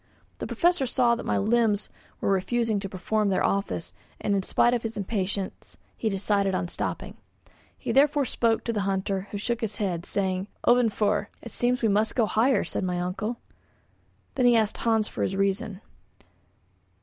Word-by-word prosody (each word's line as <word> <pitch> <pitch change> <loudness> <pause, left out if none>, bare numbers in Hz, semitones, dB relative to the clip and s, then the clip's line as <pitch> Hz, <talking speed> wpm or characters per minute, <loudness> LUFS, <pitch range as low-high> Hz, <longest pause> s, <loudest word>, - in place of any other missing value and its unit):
The - - -4
Professor 345 -6 +2
saw 245 -1 +3
that 235 - -4
my - - +1
limbs 215 -1 +2 0.3
were - - +1
refusing 220 +3 +1
to 195 -1 -5
perform 205 +3 0
their 190 - +1
office, 195 -4 -1 0.3
and 205 - 0
in 195 - +1
spite 240 +5 +3
of 240 - 0
his 225 -1 -5
impatience 200 -1 -3 0.2
he 220 - -1
decided 195 -1 +1
on 175 - -2
stopping. - - -4 0.6
He - - -3
therefore 285 0 +4
spoke 230 -2 +1
to 230 - -2
the 210 - -1
hunter, 195 0 -1
who 205 - -4
shook 235 +3 -2
his 220 -2 -3
head, 180 -5 -2
saying: 190 -1 -1 0.2
"Ofvanför." 215 -4 +3 0.2
"It 235 - -7
seems 245 +2 0
we - - +5
must 215 +1 +2
go 235 - +3
higher," 240 +5 +2
said - - -3
my 180 -1 -1
uncle. 205 +6 -3 1.0
Then 255 -2 +3
he 240 - +6
asked 220 -2 +1
Hans 225 -2 +2
for - - -6
his 190 - 0
reason. 195 +1 -1
210 Hz, 175 wpm, -26 LUFS, 195-235 Hz, 1.0 s, he